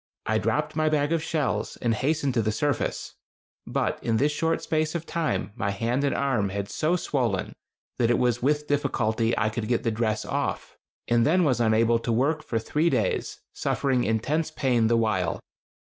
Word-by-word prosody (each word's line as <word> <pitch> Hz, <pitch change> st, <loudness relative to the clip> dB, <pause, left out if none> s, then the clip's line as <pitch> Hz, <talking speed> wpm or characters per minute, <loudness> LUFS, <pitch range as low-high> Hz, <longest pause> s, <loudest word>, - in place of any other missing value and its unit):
I -, -, +1 dB
dropped -, -, -1 dB
my 155 Hz, 0 st, +2 dB
bag 150 Hz, 0 st, +1 dB
of 165 Hz, -, +1 dB
shells, 145 Hz, -10 st, -2 dB
and 120 Hz, -2 st, 0 dB
hastened 140 Hz, +3 st, 0 dB
to 115 Hz, -, +2 dB
the 110 Hz, 0 st, 0 dB
surface; 145 Hz, +6 st, -2 dB, 0.5 s
but -, -, -1 dB
in 115 Hz, -1 st, +1 dB
this 145 Hz, +6 st, +2 dB
short 165 Hz, +2 st, 0 dB
space 155 Hz, 0 st, 0 dB
of 165 Hz, -1 st, -3 dB
time 165 Hz, -10 st, -2 dB
my 100 Hz, -5 st, -1 dB
hand 115 Hz, +6 st, -1 dB
and 140 Hz, -, +1 dB
arm 125 Hz, -8 st, +1 dB
had 100 Hz, +1 st, -4 dB
so 160 Hz, +3 st, +1 dB
swollen 125 Hz, -, -1 dB, 0.5 s
that 115 Hz, -2 st, +3 dB
it 120 Hz, -, +3 dB
was 120 Hz, -1 st, +1 dB
with 150 Hz, +3 st, +1 dB
difficulty 120 Hz, -6 st, 0 dB
I 110 Hz, -, +2 dB
could 110 Hz, 0 st, -4 dB
get 120 Hz, 0 st, 0 dB
the 115 Hz, -, +1 dB
dress 110 Hz, -1 st, -1 dB
off, -, -, -3 dB, 0.3 s
and 120 Hz, 0 st, +3 dB
then 180 Hz, +6 st, +3 dB
was 130 Hz, -7 st, +2 dB
unable 115 Hz, +1 st, +3 dB
to 115 Hz, -, -2 dB
work 140 Hz, +7 st, +1 dB
for 115 Hz, -, -3 dB
three 150 Hz, +9 st, +1 dB
days, -, -, -1 dB
suffering 130 Hz, -3 st, 0 dB
intense 145 Hz, +9 st, 0 dB
pain 125 Hz, -7 st, +1 dB
the 115 Hz, +1 st, +3 dB
while. 105 Hz, -7 st, 0 dB
125 Hz, 190 wpm, -26 LUFS, 110-150 Hz, 0.5 s, that